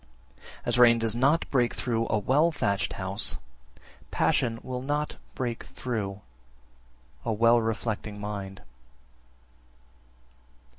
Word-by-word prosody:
14. -, -, -17 dB
As 120 Hz, 0 st, +1 dB
rain 120 Hz, -1 st, +8 dB
does 115 Hz, -1 st, +1 dB
not 140 Hz, +7 st, +3 dB
break 125 Hz, -3 st, +2 dB
through 115 Hz, -2 st, 0 dB
a -, -, +2 dB
well 145 Hz, +10 st, +3 dB
thatched 100 Hz, -10 st, 0 dB
house, 95 Hz, +2 st, -2 dB, 0.7 s
passion 115 Hz, -1 st, +1 dB
will 125 Hz, -1 st, -4 dB
not 145 Hz, +3 st, -2 dB, 0.2 s
break 120 Hz, -3 st, -3 dB
through 105 Hz, -5 st, -4 dB, 1.0 s
a -, -, -1 dB
well 115 Hz, +2 st, +5 dB
reflecting 110 Hz, -2 st, -3 dB
mind. 100 Hz, -2 st, -5 dB
115 Hz, 110 wpm, -28 LUFS, 105-125 Hz, 1.0 s, rain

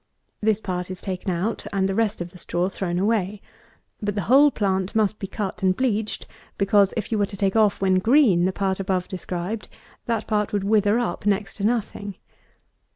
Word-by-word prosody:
This 215 Hz, -1 st, +2 dB
part 180 Hz, -3 st, -4 dB
is 185 Hz, -1 st, -6 dB
taken 190 Hz, 0 st, -4 dB
out, 185 Hz, +5 st, -1 dB
and 195 Hz, -1 st, +1 dB
the 195 Hz, -, -1 dB
rest 220 Hz, -1 st, 0 dB
of 175 Hz, 0 st, -5 dB
the 180 Hz, -, -14 dB
straw 175 Hz, +2 st, -1 dB
thrown 180 Hz, -3 st, -3 dB
away. 205 Hz, 0 st, 0 dB, 0.6 s
But 205 Hz, -1 st, -2 dB
the 205 Hz, -, -1 dB
whole 275 Hz, -, +6 dB
plant 190 Hz, -5 st, -1 dB
must 215 Hz, -1 st, +1 dB
be 195 Hz, -, -4 dB
cut 200 Hz, 0 st, -4 dB
and 185 Hz, -1 st, +3 dB
bleached; 220 Hz, -4 st, -1 dB, 0.3 s
because, 200 Hz, 0 st, +4 dB
if 225 Hz, -, -3 dB
you 220 Hz, -, +1 dB
were 205 Hz, -, +2 dB
to 195 Hz, -, -9 dB
take 195 Hz, 0 st, 0 dB
off, 215 Hz, -3 st, +3 dB
when 190 Hz, -1 st, +3 dB
green, 220 Hz, -, +4 dB
the 190 Hz, -, +2 dB
part 190 Hz, 0 st, -1 dB
above 185 Hz, -2 st, -1 dB
described, 185 Hz, +2 st, -5 dB, 0.4 s
that 230 Hz, -2 st, -1 dB
part 210 Hz, -2 st, 0 dB
would 205 Hz, -2 st, 0 dB
wither 210 Hz, +1 st, +3 dB
up 235 Hz, -3 st, -2 dB
next 200 Hz, 0 st, 0 dB
to 200 Hz, -, -5 dB
nothing. 210 Hz, -3 st, -1 dB
200 Hz, 200 wpm, -24 LUFS, 190-215 Hz, 0.6 s, whole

